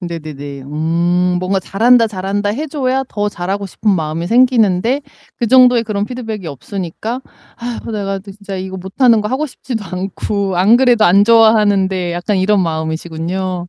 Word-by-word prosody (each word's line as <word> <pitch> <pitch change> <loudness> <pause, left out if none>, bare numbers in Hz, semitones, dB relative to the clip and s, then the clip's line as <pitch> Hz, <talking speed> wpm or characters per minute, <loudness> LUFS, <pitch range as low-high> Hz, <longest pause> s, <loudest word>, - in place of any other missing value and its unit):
네네네. 150 -5 -7
음, 170 +5 0
뭔가 190 +1 -1
"잘한다, 230 +5 +3
잘한다" 200 +1 -2
해 280 +9 -3
줘야 270 -3 -1
더 205 0 -2
잘하고 195 +2 -4
싶은 210 +3 -1
마음이 165 -2 -1
생기는데 235 0 +3 0.4
그 235 - -1
정도의 250 -1 +5
그런 205 -2 -2
피드백이 220 -6 -6
없으니까 195 - -5 0.4
'아이고, 235 -1 -6
내가 195 -2 -2
그 195 +1 -11
진짜 200 -1 -8
이거 190 0 -5
못하는 215 +5 +2
거 210 - -3
하고 275 +4 -1
싶지도 240 -5 -6
않고 190 +1 -3
안 200 +6 +5
그래도 245 -4 +4
안 200 +2 +5
좋아하는데.' 205 -5 +3
약간 175 +4 -1
이런 195 +2 +2
마음이시군요. 170 +3 -3
195 Hz, 365 characters per minute, -16 LUFS, 180-225 Hz, 0.4 s, 정도의